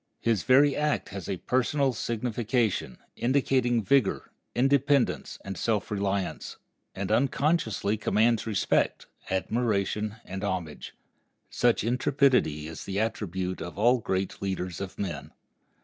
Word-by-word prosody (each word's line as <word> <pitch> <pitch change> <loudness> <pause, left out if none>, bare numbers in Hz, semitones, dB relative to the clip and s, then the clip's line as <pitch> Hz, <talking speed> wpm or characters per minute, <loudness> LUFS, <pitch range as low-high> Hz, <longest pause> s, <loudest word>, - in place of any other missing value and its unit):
His 115 -5 +1
very 140 +2 +5
act 150 0 0
has 95 -4 -7
a 95 - -1
personal 130 +5 +1
signification, 115 - -1 0.2
indicating 125 -2 +1
vigor, 120 +1 +1 0.2
independence, 140 +1 +2
and 95 0 -4
self 110 +1 -1
reliance, 100 -2 -2 0.4
and 100 +1 -3
unconsciously 125 - +1
commands 110 +2 +2
respect, 105 -3 +1 0.2
admiration, 105 +1 0
and 95 +2 -6
homage. 90 -6 -4 0.6
Such 120 -4 +2
intrepidity 125 - +2
is 80 - -8
the 100 0 -2
attribute 95 -4 -2
of 85 - -7
all 120 +4 +4
great 95 -3 -2
leaders 95 -2 -3
of 95 -1 -6
men. 85 -9 -5
110 Hz, 115 wpm, -27 LUFS, 95-125 Hz, 0.6 s, very